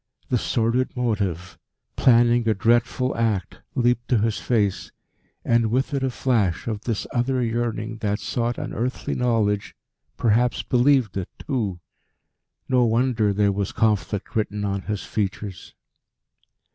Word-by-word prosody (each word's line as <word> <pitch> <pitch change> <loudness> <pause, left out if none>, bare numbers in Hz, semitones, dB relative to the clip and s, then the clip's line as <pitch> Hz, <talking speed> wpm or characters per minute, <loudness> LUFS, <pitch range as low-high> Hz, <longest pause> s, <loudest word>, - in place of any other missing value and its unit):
The 125 - +2
sordid 120 +3 0
motive, 95 -8 -2 0.4
planning 120 -1 +4
a 110 - +2
dreadful 120 +5 +1
act, 110 -5 -1 0.2
leaped 120 -1 +1
to 125 - +3
his 110 0 0
face, 105 -6 0 0.5
and 115 -1 +3
with 130 +5 0
it 140 - 0
a 130 - +1
flash 115 -8 0
of 110 -2 -4
this 115 -4 -2
other 125 +2 +1
yearning 115 -1 -2
that 105 -2 -1
sought 120 -1 -2
unearthly 125 +3 -3
knowledge, 110 -5 0 0.4
perhaps 120 +2 +2
believed 125 -5 +2
it 95 - -3
too. 105 - -3 0.9
No 125 -1 +3
wonder 115 -2 +2
there 100 0 +2
was 100 0 -2
conflict 105 -2 0
written 105 -1 -1
on 100 -1 -1
his 105 0 -4
features. 100 -2 -4
115 Hz, 135 wpm, -23 LUFS, 105-120 Hz, 0.9 s, planning